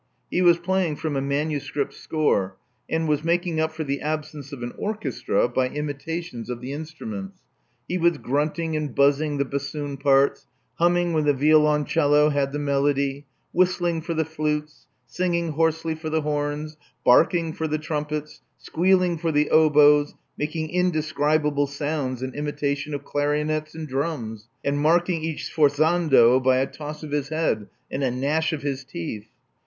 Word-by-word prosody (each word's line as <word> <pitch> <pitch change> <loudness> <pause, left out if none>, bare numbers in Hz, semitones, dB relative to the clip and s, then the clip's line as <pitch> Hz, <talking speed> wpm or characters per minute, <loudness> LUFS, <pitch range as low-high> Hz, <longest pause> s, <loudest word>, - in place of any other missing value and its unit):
He 180 - +1
was 175 -2 +6
playing 175 -2 0
from 155 -1 -3
a 135 - 0
manuscript 140 0 -2
score, 100 -12 0 0.3
and 160 0 0
was 150 0 +1
making 170 -1 0
up 160 0 +1
for 160 0 -4
the 140 -1 -3
absence 150 -2 -4
of 135 -4 -7
an 120 - -5
orchestra 215 - -1
by 125 +1 0
imita 150 +4 -4
tions 120 -8 -8
of 120 -1 -4
the 130 +3 -6
instruments. 195 +6 -7 0.5
He 180 - -1
was 170 -1 +3
grunting 155 +4 -1
and 150 -4 -3
buzzing 145 +1 +3
the 140 - +1
bassoon 140 +1 -4
parts, 140 0 +2 0.3
humming 175 0 +2
when 155 -2 +1
the 145 -1 +3
violon 150 +1 +4
cello 150 -1 +3
had 140 -2 0
the 145 - -3
melody, 140 -1 0 0.3
whistling 175 -2 +1
for 170 +1 -4
the 160 0 +1
flutes, 150 -1 -3 0.2
singling 170 -2 -1
hoarsely 160 +1 0
for 160 0 -6
the 160 0 0
horns, 150 +1 -3 0.3
barking 165 +5 +4
for 160 - -2
the 155 0 -1
trumpets, 150 0 -4 0.2
squealing 180 0 +1
for 165 0 0
the 150 0 +1
oboes, 150 -1 +5 0.2
making 155 +1 -3
indescribable 155 -4 +1
sounds 140 -3 -3
in 130 -1 -4
imitation 145 0 -2
of 140 0 -7
clarionets 150 +1 -1
and 160 -1 -6
drums, 130 -6 -3 0.2
and 140 0 +1
marking 170 +2 +2
each 160 -1 -4
sforzando 145 -4 +4
by 130 0 +4
a 130 - +2
toss 150 +2 -8
of 150 - -7
his 145 -1 -1
head 155 -10 -1 0.2
and 140 - -2
a 130 - +2
gnash 145 +6 0
of 155 -3 -4
his 140 -2 -2
teeth. 105 -3 -6
150 Hz, 165 wpm, -24 LUFS, 140-160 Hz, 0.5 s, was